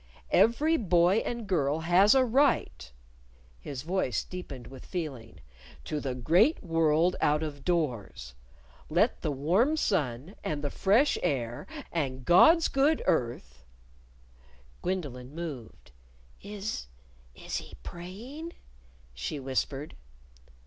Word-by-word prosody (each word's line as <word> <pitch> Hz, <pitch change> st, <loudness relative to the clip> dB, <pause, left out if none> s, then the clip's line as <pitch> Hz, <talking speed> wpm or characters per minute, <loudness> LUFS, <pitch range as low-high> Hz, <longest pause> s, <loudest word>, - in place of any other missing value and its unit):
Every 300 Hz, +8 st, +4 dB
boy 180 Hz, -, +3 dB
and 235 Hz, 0 st, -2 dB
girl 155 Hz, -5 st, 0 dB
has 180 Hz, +7 st, +5 dB
a 260 Hz, -1 st, +5 dB
right" 245 Hz, -, +1 dB, 0.7 s
(his 140 Hz, -2 st, -7 dB
voice 165 Hz, -, -1 dB
deepened 140 Hz, -9 st, -8 dB
with 130 Hz, +2 st, -11 dB
feeling) 145 Hz, -11 st, -6 dB, 0.4 s
"to 150 Hz, -, -3 dB
the 130 Hz, -3 st, -3 dB
great 175 Hz, -, +3 dB
world 165 Hz, 0 st, +2 dB
out 150 Hz, +1 st, +2 dB
of 145 Hz, -3 st, -6 dB
doors. 140 Hz, -, -2 dB, 0.6 s
Let -, -, +2 dB
the -, -, -1 dB
warm 185 Hz, -, +2 dB
sun, 150 Hz, -, -1 dB
and 150 Hz, -1 st, -3 dB
the 145 Hz, -, -2 dB
fresh 225 Hz, +9 st, +3 dB
air, 120 Hz, -8 st, -2 dB, 0.2 s
and 130 Hz, -6 st, -3 dB
God's 320 Hz, -, +6 dB
good 285 Hz, +3 st, +2 dB
earth 65 Hz, -, -1 dB, 0.6 s
" 60 Hz, 0 st, -28 dB
Gwendolyn 145 Hz, -8 st, -4 dB
moved. 150 Hz, -9 st, -8 dB, 0.5 s
"Is 205 Hz, -, -5 dB, 0.5 s
is -, -, -5 dB
he -, -, -8 dB
praying?" 235 Hz, -, -8 dB, 0.6 s
she 65 Hz, -, -4 dB
whispered. 135 Hz, +2 st, -3 dB
160 Hz, 115 wpm, -29 LUFS, 130-195 Hz, 0.7 s, God's